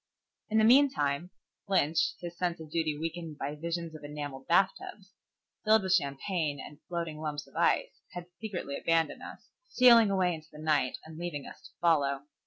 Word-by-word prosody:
In 220 - +1
the 220 - +5
meantime, 180 - +4 0.4
Lynch, 165 -5 +2
his 175 -1 -7
sense 175 -1 -2
of 155 -2 -10
duty 155 -2 0
weakened 165 -1 -5
by 140 +1 -3
visions 165 +1 -4
of 155 - -11
enamelled 145 -2 -7
bathtubs 195 +2 0 0.5
filled 215 -1 +4
with 190 -1 +1
champagne 150 -1 0
and 145 +2 -10
floating 170 -3 -4
lumps 150 -2 -4
of - - -22
ice, - - +1
had 175 -1 -6
secretly 175 -10 -4
abandoned 165 -1 0
us, - - -11 0.2
stealing 235 - +7
away 185 -2 +2
in 160 - -7
the 150 - -13
night 150 -4 +1
and 160 0 -10
leaving 170 -5 -4
us - - -11
to - - -26
follow. 140 -5 +2
165 Hz, 175 wpm, -30 LUFS, 150-185 Hz, 0.5 s, stealing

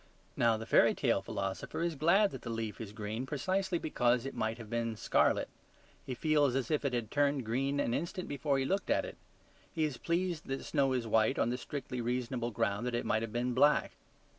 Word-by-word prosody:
Now, 115 -1 +3
the 110 - -6
fairy - - +5
tale - - +1
philosopher 95 - -3
is 170 -1 0
glad 170 +8 +4
that - - -7
the 120 - -6
leaf 115 -1 -4
is 105 -3 -6
green 110 +4 -4
precisely 185 +6 0
because 125 -6 +1
it 135 - -4
might 110 +1 -2
have 115 -2 -9
been 115 0 -2
scarlet. - - +2 0.6
He 130 - -5
feels 145 -3 +2
as 135 +3 -1
if 150 - +1
it 140 -3 0
had 120 -3 -2
turned 145 -3 +1
green 135 +5 0
an 115 - 0
instant 170 +5 -3
before 140 0 0
he 135 - 0
looked 195 +7 -1
at - - +2
it. - - -9 0.5
He 160 - -1
is 150 -5 -1
pleased 170 +1 -1
that 135 0 -4
snow 135 -2 +1
is 125 -2 -1
white 110 +4 +2
on 120 - +1
the 125 - -1
strictly 125 -3 -5
reasonable 120 0 -2
ground 105 +1 -1
that 120 - -1
it 120 - -2
might 110 - +1
have 115 -1 -4
been 120 +2 -1
black. 145 +4 +4
125 Hz, 215 wpm, -32 LUFS, 115-150 Hz, 0.6 s, fairy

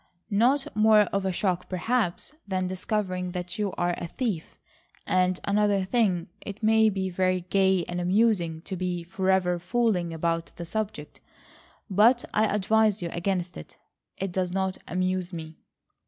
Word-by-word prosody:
"Not 265 +8 +2
more 215 0 +6
of 200 -1 -1
a - - +1
shock, 180 -1 -1
perhaps, 205 +4 -1
than 185 -1 -1
discovering 185 -1 -2
that 180 +3 -5
you 205 -2 0
are 175 0 +1
a 170 - -4
thief. 200 -5 -4 0.5
And 185 0 +2
another 200 -1 +2
thing, 190 -6 +1 0.2
it 205 +2 -8
may 220 0 +5
be 190 -2 -2
very 185 0 +1
gay 190 0 +2
and 175 0 -3
amusing 180 -4 +1
to 190 - -5
be 180 -1 -2
forever 185 -1 +1
fooling 185 -3 0
about 165 +1 -2
the 170 - -6
subject, 215 +4 -4 0.7
but 230 +5 +4
I 215 - +3
advise 210 -1 +2
you 170 - -2
against 180 0 -2
it. 75 - -11 0.4
It 195 -1 -3
does 180 0 -1
not 190 0 -1
amuse 185 0 -1
me." 160 -1 -8
185 Hz, 155 wpm, -27 LUFS, 180-210 Hz, 0.7 s, more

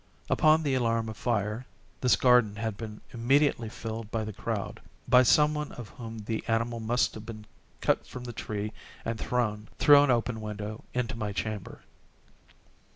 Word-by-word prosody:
Upon 155 +1 +5
the 140 -3 +1
alarm 115 -3 +1
of 110 - -6
fire, 110 +1 -1 0.3
this 125 -5 +5
garden 125 -3 +4
had 110 0 -3
been 105 0 -8
immediately 120 0 +2
filled 110 0 -6
by 110 0 -2
the 110 0 -5
crowd—by 125 +5 0
some 150 +4 +5
one 150 -1 -3
of 120 -3 -8
whom 115 -2 -8
the 110 0 -2
animal 115 +1 0
must 115 +2 +1
have 110 - -8
been 110 -2 -9 0.4
cut - - +1
from 125 - -8
the 120 -1 -6
tree 105 -1 -4 0.3
and 115 -1 -2
thrown, 110 -4 -1
through 145 -1 +8
an 145 - +3
open 120 -2 +1
window, 105 0 -5
into 125 0 -1
my 105 -2 -3
chamber. 100 +2 -4
115 Hz, 165 wpm, -29 LUFS, 110-125 Hz, 0.4 s, through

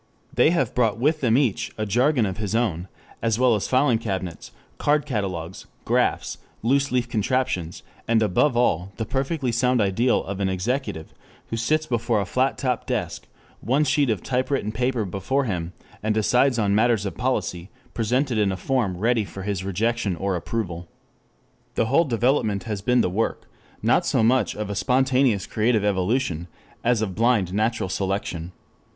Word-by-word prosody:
They - - +4
have 150 -9 0
brought 115 -3 +1
with 150 +6 +1
them 120 -2 +3
each 120 -5 0
a 110 - -1
jargon 125 +4 +2
of 95 -1 -3
his 110 0 -2
own, 95 -7 0 0.3
as 115 -1 +1
well 125 -1 +4
as 105 - -1
filing 130 -3 +3
cabinets, 95 -6 -4 0.3
card 150 0 +2
catalogues, 95 - -4 0.2
graphs, - - 0 0.2
loose 135 +4 +2
leaf 125 -1 +1
contraptions, 105 -7 -1 0.2
and 115 -1 +3
above 120 +6 +2
all 95 -5 +1
the 110 - -2
perfectly 135 +2 -1
sound 125 +2 +2
ideal 110 +5 +2
of 100 0 -5
an 95 -1 +1
executive 95 - -3 0.4
who - - 0
sits 155 +8 +1
before 120 -4 0
a 100 - -1
flat 130 +7 0
top 125 -3 -2
desk, - - -3 0.3
one 135 +7 +1
sheet 145 -1 +2
of 105 -6 -1
typewritten 130 -3 -1
paper 120 0 -1
before 100 +9 -1
him, 90 -8 -3 0.3
and 110 0 0
decides 125 +4 +3
on 100 -3 +1
matters 110 -1 +2
of 100 - -4
policy 100 -8 -2 0.2
presented 120 +1 0
in 100 -2 +2
a 95 - -3
form 115 -7 -1
ready 115 +3 +2
for 95 -1 -8
his 100 -2 -2
rejection 105 +1 -1
or 95 +2 -1
approval. 90 -2 -4 0.9
This 115 - +1
whole 165 +6 +4
development 115 -5 +1
has 105 -4 -4
been 125 +3 +3
the - - +1
work, 110 +5 -1 0.4
not - - +3
so - - +2
much 120 0 +2
of 105 -1 -4
a - - -3
spontaneous 130 -3 +2
creative 110 -1 +1
evolution, 95 -3 0 0.4
as 115 -2 +2
of 95 -4 -3
blind 110 -4 +2
natural 110 0 0
selection. 95 -3 -3
115 Hz, 170 wpm, -24 LUFS, 100-125 Hz, 0.9 s, They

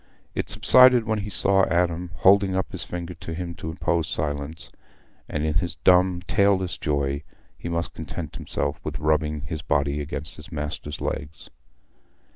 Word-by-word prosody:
It - - -3
subsided 125 -2 +7
when 110 -1 0
he 100 +1 -5
saw 95 +1 +4
Adam, 85 0 0
holding 95 0 +4
up 95 - -2
his - - -3
finger 90 0 -5
at - - -11
him 85 0 -5
to 80 - -7
impose 85 0 -1
silence, 75 +1 -3 0.6
and 75 0 -2
in 80 - 0
his 85 +2 -1
dumb, 90 -1 +4
tailless 95 -2 +1
joy 70 -2 -1 0.3
he 85 - -7
must 85 0 -2
content 80 -1 -6
himself - - -3
with - - -4
rubbing 75 0 0
his 80 0 -5
body 70 +1 0
against 75 +1 -5
his 80 +3 -11
master's 75 0 -5
legs. 75 +3 -5
85 Hz, 160 wpm, -24 LUFS, 75-90 Hz, 0.6 s, subsided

